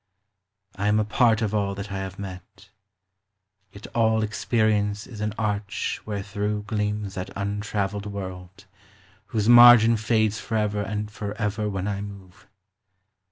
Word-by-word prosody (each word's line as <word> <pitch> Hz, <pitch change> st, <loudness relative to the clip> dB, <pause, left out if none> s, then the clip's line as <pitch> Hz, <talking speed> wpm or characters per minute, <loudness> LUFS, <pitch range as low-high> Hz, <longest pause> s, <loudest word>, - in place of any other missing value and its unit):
I 100 Hz, +1 st, -1 dB
am 105 Hz, +1 st, +3 dB
a 105 Hz, -, +1 dB
part 110 Hz, +1 st, +3 dB
of 110 Hz, -1 st, -1 dB
all 100 Hz, -2 st, 0 dB
that 100 Hz, +1 st, -7 dB
I 100 Hz, -, -3 dB
have 95 Hz, 0 st, -6 dB
met; 95 Hz, -2 st, -10 dB, 1.0 s
Yet 100 Hz, +2 st, -12 dB
all 110 Hz, -1 st, +2 dB
experience 105 Hz, -1 st, 0 dB
is 110 Hz, -4 st, -9 dB
an 105 Hz, 0 st, -2 dB
arch 105 Hz, -1 st, -2 dB
wherethrough 105 Hz, 0 st, -3 dB
Gleams 105 Hz, -2 st, -2 dB
that 95 Hz, -1 st, -5 dB
untra 100 Hz, 0 st, -2 dB
veiled 100 Hz, +1 st, -6 dB
world, 95 Hz, -1 st, -8 dB, 0.6 s
whose 110 Hz, -2 st, -1 dB
margin 120 Hz, -1 st, +8 dB
fades 110 Hz, -1 st, +1 dB
Forever 105 Hz, -2 st, -1 dB
and 105 Hz, +1 st, -4 dB
forever 105 Hz, 0 st, -3 dB
when 95 Hz, -1 st, -3 dB
I 100 Hz, -1 st, -2 dB
move. 100 Hz, -3 st, -11 dB
105 Hz, 140 wpm, -25 LUFS, 100-110 Hz, 1.0 s, margin